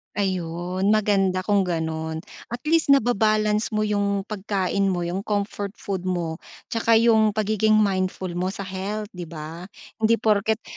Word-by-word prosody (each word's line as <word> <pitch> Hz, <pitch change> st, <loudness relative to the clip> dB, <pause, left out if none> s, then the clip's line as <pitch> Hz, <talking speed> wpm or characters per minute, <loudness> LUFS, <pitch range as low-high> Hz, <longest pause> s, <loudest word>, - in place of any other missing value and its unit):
Ayun 185 Hz, 0 st, 0 dB
maganda 195 Hz, -3 st, +2 dB
kung 200 Hz, 0 st, +2 dB
ganon, 160 Hz, -2 st, -3 dB, 0.2 s
at 240 Hz, +1 st, -6 dB
least 320 Hz, -3 st, +5 dB
naba-balance 215 Hz, -3 st, +2 dB
mo 215 Hz, -, +1 dB
yung 200 Hz, -1 st, 0 dB
pagkain 200 Hz, -1 st, -1 dB
mo 185 Hz, -2 st, 0 dB
yung 180 Hz, +4 st, -3 dB
comfort 205 Hz, -1 st, -2 dB
food 190 Hz, -4 st, -5 dB
mo, 170 Hz, -3 st, -2 dB, 0.3 s
'tsaka 230 Hz, 0 st, +2 dB
yung 220 Hz, -2 st, +4 dB
pagiging 215 Hz, 0 st, +2 dB
mindful 190 Hz, -3 st, +1 dB
mo 185 Hz, +2 st, -1 dB
sa -, -, -6 dB
health 200 Hz, +2 st, -4 dB
'di 180 Hz, -3 st, -7 dB
ba? 165 Hz, +1 st, -8 dB, 0.3 s
Hindi 225 Hz, 0 st, +2 dB
porket 215 Hz, +1 st, +2 dB
200 Hz, 145 wpm, -24 LUFS, 185-215 Hz, 0.3 s, least